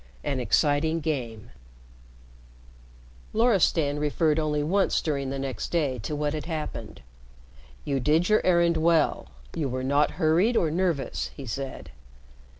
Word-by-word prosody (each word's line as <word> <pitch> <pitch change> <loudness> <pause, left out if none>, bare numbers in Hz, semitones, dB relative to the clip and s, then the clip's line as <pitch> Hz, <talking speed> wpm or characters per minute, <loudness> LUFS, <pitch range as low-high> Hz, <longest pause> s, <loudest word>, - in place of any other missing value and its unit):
VIII 145 - -2
AN 135 - -1
EXCITING 150 +5 +1
GAME 120 -8 -4 1.8
Loristan 180 -10 +2
referred 150 +1 +1
only 150 -1 0
once 190 +6 +1
during 140 -4 -2
the 135 - -3
next 135 -4 -4
day 145 -7 0
to 150 +8 -4
what 150 0 -1
had 155 - -4
happened. 160 -3 -6 0.8
"You 140 -2 0
did 155 +7 +2
your 215 0 +3
errand 170 -2 +3
well. 160 -1 +2 0.3
You 145 -4 -1
were 130 +1 -3
not 140 +3 +2
hurried 180 +8 +3
or 160 - +1
nervous," 170 -4 -1
he 140 - -7
said. 135 +3 -6
150 Hz, 140 wpm, -26 LUFS, 140-165 Hz, 1.8 s, your